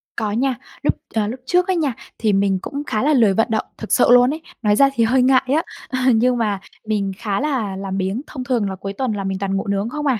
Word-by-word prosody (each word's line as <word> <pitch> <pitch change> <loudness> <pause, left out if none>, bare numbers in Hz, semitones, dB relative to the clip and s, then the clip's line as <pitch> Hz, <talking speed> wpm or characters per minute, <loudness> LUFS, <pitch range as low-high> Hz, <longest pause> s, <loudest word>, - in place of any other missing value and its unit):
Có 215 -3 -2
nha. 255 +3 0 0.3
Lúc, - - +3 0.2
ờ, 210 -2 +1
lúc 250 +4 -5
trước 360 +3 +2
á 375 - +2
nha, 300 -7 0 0.2
thì 215 -3 +1
mình 195 -1 +2
cũng 285 +1 -5
khá 215 +3 -1
là 300 +1 +3
lười 225 -7 +4
vận 225 +4 +2
động 220 - 0
thực 220 - -7
sự - - +5
luôn 245 +1 +7
ấy. 315 - -7 0.2
Nói 210 -2 +3
ra 275 +4 +5
thì 230 - +2
hơi 250 +3 +3
ngại 255 0 +5
á, 320 - +2 0.3
à, 260 0 +2
nhưng 245 +2 +2
mà 210 -4 0 0.3
mình 205 -3 -1
khá 210 -3 -2
là 255 -9 -1
làm 195 0 -4
biếng, 195 +6 -1
thông 260 -4 -6
thường 235 -6 0
là 190 - -4
cuối 195 +1 -6
tuần 255 +2 -2
là 200 -1 -3
mình 190 0 -3
toàn 195 -1 -1
ngủ 195 - -4
nướng 200 +3 -1
không 295 +2 -4
à. 250 -5 +2
225 Hz, 270 wpm, -20 LUFS, 200-260 Hz, 0.3 s, luôn